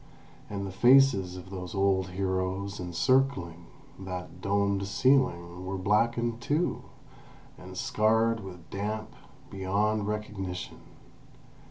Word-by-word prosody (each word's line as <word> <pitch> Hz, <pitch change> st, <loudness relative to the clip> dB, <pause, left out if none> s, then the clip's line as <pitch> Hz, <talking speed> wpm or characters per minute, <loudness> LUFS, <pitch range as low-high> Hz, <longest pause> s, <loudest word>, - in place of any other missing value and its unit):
And 100 Hz, -1 st, -4 dB
the 95 Hz, -, -5 dB
faces 110 Hz, -4 st, +5 dB
of 90 Hz, +1 st, -10 dB
those 90 Hz, 0 st, -6 dB
old 95 Hz, -1 st, +2 dB
heroes 95 Hz, +1 st, -2 dB
encircling 90 Hz, -2 st, +1 dB, 0.3 s
that 90 Hz, -1 st, -7 dB
domed 100 Hz, 0 st, +1 dB
ceiling 100 Hz, -6 st, +2 dB
were 95 Hz, +1 st, -3 dB
blackened 115 Hz, +4 st, +1 dB
too, 150 Hz, +7 st, 0 dB, 0.7 s
and -, -, -11 dB
scarred 110 Hz, +1 st, +2 dB
with 90 Hz, -4 st, -10 dB
damp, 105 Hz, +2 st, -3 dB, 0.4 s
beyond 100 Hz, +2 st, 0 dB
recognition. 105 Hz, -4 st, -4 dB
100 Hz, 105 wpm, -29 LUFS, 95-110 Hz, 0.7 s, faces